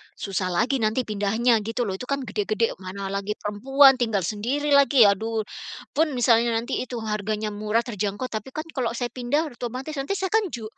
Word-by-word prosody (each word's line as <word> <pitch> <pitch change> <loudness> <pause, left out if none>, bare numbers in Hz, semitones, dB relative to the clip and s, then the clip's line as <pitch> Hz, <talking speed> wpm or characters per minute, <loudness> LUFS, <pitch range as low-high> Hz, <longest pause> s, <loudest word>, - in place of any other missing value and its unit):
susah 195 -2 -2
lagi 230 +10 +1
nanti 220 +3 +1
pindahnya 220 +2 +1
gitu 225 +3 -2
loh. 205 - -2
Itu 250 - -7
kan 280 -1 -1
gede-gede, 215 0 -1
mana 195 +1 -6
lagi 200 +1 -2
perempuan, 270 +6 +4
tinggal 225 -6 0
sendiri 245 - -1
lagi, 280 -3 +6
aduh. 220 +2 +2 0.5
Pun 305 -3 +1
misalnya 235 -1 +3
nanti 235 +4 -2
itu 250 0 -5
harganya 215 0 -2
murah, 210 +2 0
terjangkau, 210 +1 -3
tapi 230 +4 -6
kan 310 - -2
kalau 240 -5 -2
saya 240 0 -3
pindah 275 +6 -1
otomatis 255 +5 -5
nanti 280 +9 -2
saya 380 -1 -2
kan 440 -2 +2
ju 240 -9 -7
230 Hz, 185 wpm, -24 LUFS, 210-265 Hz, 0.5 s, lagi